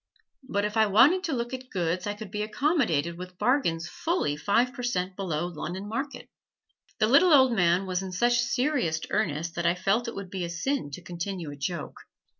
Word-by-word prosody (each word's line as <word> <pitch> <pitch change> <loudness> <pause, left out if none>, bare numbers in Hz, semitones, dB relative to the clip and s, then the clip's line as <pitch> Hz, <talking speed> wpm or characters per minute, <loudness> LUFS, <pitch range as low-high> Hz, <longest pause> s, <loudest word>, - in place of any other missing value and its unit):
But 200 +1 0
if 210 +1 -3
I 220 -1 +5
wanted 270 - +5
to 330 - -2
look 240 0 -3
at 255 0 -6
goods 180 +1 -1
I 205 - -2
could 210 -2 -9
be 210 -1 -3
accommodated 210 - 0
with 180 0 -9
bargains 180 - +1
fully 330 - -1
five 235 +11 +1
per 265 - -7
cent 185 -6 -1
below 175 -5 -2
Lunnon 175 +3 -5
market. 270 +4 -4 0.7
The - - +3
little 325 +9 +6
old 265 -4 +7
man 180 -3 +2
was 185 -1 -1
in 190 -1 -6
such 240 +6 +2
serious 240 - 0
earnest 165 -5 -1
that 170 -1 -1
I 170 - +3
felt 205 +6 +1
it 230 - -5
would 195 -2 -7
be 190 -2 -3
a 170 - -3
sin 215 - -2
to 175 - -7
continue 175 -1 -5
a - - -8
joke. 150 +3 -5
200 Hz, 205 wpm, -27 LUFS, 175-245 Hz, 0.7 s, old